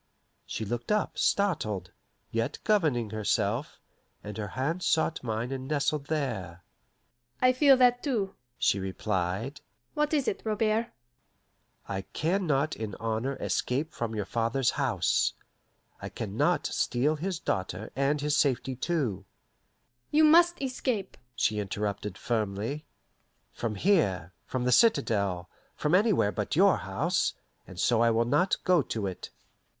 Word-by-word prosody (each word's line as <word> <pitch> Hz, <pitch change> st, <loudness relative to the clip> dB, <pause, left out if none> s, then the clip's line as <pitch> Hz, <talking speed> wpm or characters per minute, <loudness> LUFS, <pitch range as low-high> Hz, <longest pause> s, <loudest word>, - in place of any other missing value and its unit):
She 110 Hz, -, -4 dB
looked 120 Hz, -, -3 dB
up, 210 Hz, -1 st, 0 dB
startled, 110 Hz, -, 0 dB, 0.4 s
yet 115 Hz, 0 st, -1 dB
governing 150 Hz, -, +2 dB
herself, 110 Hz, +3 st, -1 dB, 0.4 s
and 105 Hz, 0 st, -7 dB
her 105 Hz, -, -3 dB
hand 160 Hz, +7 st, -1 dB
sought 165 Hz, -3 st, +1 dB
mine 115 Hz, +1 st, -2 dB
and 130 Hz, -1 st, -4 dB
nestled 145 Hz, 0 st, 0 dB
there. 95 Hz, -, -3 dB, 0.8 s
"I 255 Hz, 0 st, +5 dB
feel 270 Hz, 0 st, +6 dB
that, 245 Hz, -1 st, +4 dB
too," 220 Hz, -9 st, -1 dB, 0.2 s
she 100 Hz, -, +2 dB
replied. 95 Hz, +6 st, -2 dB, 0.3 s
"What 300 Hz, -1 st, 0 dB
is 290 Hz, -5 st, +1 dB
it, -, -, -1 dB
Robert?" 220 Hz, +1 st, +1 dB, 1.0 s
"I 95 Hz, -1 st, -3 dB
can 180 Hz, +4 st, 0 dB
not 145 Hz, +1 st, +1 dB
in 110 Hz, -3 st, -5 dB
honour 115 Hz, +5 st, -2 dB
escape 140 Hz, +6 st, -1 dB
from 115 Hz, -2 st, -3 dB
your 105 Hz, -2 st, -2 dB
father's 120 Hz, +3 st, +1 dB
house. 120 Hz, -, +1 dB, 0.7 s
I -, -, -5 dB
can -, -, -6 dB
not -, -, +2 dB
steal 135 Hz, +6 st, +1 dB
his 180 Hz, +3 st, -2 dB
daughter 95 Hz, -, -3 dB
and 140 Hz, +2 st, +1 dB
his 150 Hz, 0 st, +1 dB
safety 135 Hz, -2 st, +1 dB
too 125 Hz, -, -1 dB, 0.4 s
" 120 Hz, -, -46 dB
"You 310 Hz, +1 st, +4 dB
must 340 Hz, +3 st, +6 dB
escape," 250 Hz, -6 st, -2 dB, 0.2 s
she 105 Hz, -1 st, +1 dB
interrupted 100 Hz, -1 st, -3 dB
firmly. 110 Hz, +6 st, -2 dB, 0.7 s
"From 115 Hz, -2 st, -3 dB
here, 100 Hz, -, +1 dB
from 130 Hz, -1 st, -2 dB
the 125 Hz, -, +1 dB
citadel, 100 Hz, -, +3 dB, 0.3 s
from 150 Hz, -, -1 dB
anywhere 190 Hz, -, +4 dB
but -, -, -2 dB
your -, -, +5 dB
house; -, -, 0 dB, 0.3 s
and 90 Hz, -, -10 dB
so 115 Hz, +2 st, +3 dB
I 115 Hz, -, +5 dB
will 115 Hz, +1 st, +2 dB
not 180 Hz, +10 st, +2 dB
go 180 Hz, -4 st, +4 dB
to 110 Hz, -5 st, -3 dB
it." 95 Hz, -2 st, -5 dB
130 Hz, 140 wpm, -28 LUFS, -, 1.0 s, feel